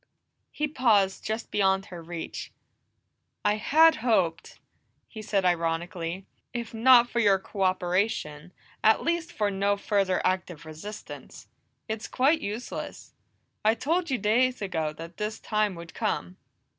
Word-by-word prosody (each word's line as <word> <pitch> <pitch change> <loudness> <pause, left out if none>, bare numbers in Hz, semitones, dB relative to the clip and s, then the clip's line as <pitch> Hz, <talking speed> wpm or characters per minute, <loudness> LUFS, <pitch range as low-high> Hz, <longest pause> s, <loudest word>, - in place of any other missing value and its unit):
He 300 0 -2
paused 215 -9 +2
just 220 +1 -4
beyond 195 -1 +2
her 170 - -7
reach. 165 0 -6 0.9
"I 210 +1 +3
had 320 +8 +5
hoped," 190 -9 0 0.5
he 220 - -9
said 200 -3 0
ironically, 170 +1 -1 0.3
"if 235 -1 -4
not 240 +1 +6
for 240 - -2
your 200 -4 +5
cooperation, 185 -4 -1 0.3
at 220 0 +4
least 340 0 -1
for 210 -7 0
no 200 +1 +1
further 200 -2 +1
active 180 -4 -1
resistance. 160 +7 -9 0.4
It's 220 0 -4
quite 290 +5 +2
useless; 215 +2 -6 0.5
I 220 +1 +4
told 335 +7 0
you 265 - +1
days 245 +5 +2
ago 165 -6 -2
that 165 +2 -10
this 215 0 -3
time 210 -2 0
would 170 0 -10
come." 90 +1 -2
205 Hz, 130 wpm, -27 LUFS, 180-230 Hz, 0.9 s, not